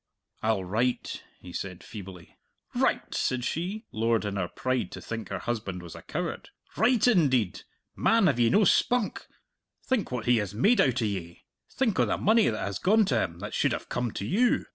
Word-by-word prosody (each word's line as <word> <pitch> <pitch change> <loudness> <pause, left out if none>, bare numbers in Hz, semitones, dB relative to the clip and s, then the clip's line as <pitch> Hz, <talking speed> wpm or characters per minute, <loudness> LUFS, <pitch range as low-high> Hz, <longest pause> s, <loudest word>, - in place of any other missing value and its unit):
"I'll 110 -3 +1
write," 115 +7 -1 0.2
he 90 -1 -11
said 90 -1 -5
feebly. 95 -5 -10 0.4
"Write!" - - 0
said 125 -1 0
she, 195 +7 -3
lowered 115 0 +1
in 100 -1 -3
her 95 -3 -1
pride 130 +7 -2
to - - -6
think 115 -1 -6
her - - -2
husband 100 -6 -4
was 85 - -9
a - - -10
coward. - - -4 0.3
"Write, 230 +3 +3
indeed! 130 - +3 0.3
Man, 225 -3 +3
have 135 -8 +2
ye 115 -1 +4
no 210 - +4
spunk? 245 +3 +2 0.6
Think 260 - 0
what 120 -3 -3
he 120 -1 +4
has 105 -2 -2
made 210 - +4
out 130 -2 +2
o' - - +2
ye! 90 -5 -5 0.3
Think 240 -6 0
o' - - +5
the - - 0
money 220 +1 +4
that 110 - -2
has 100 -2 -3
gone 215 +3 +4
to 120 -10 +1
him 85 -1 -3
that 105 - -6
should - - +2
have - - -5
come 125 -1 -1
to 100 - -4
you! 235 - +2
120 Hz, 200 wpm, -28 LUFS, -, 0.6 s, o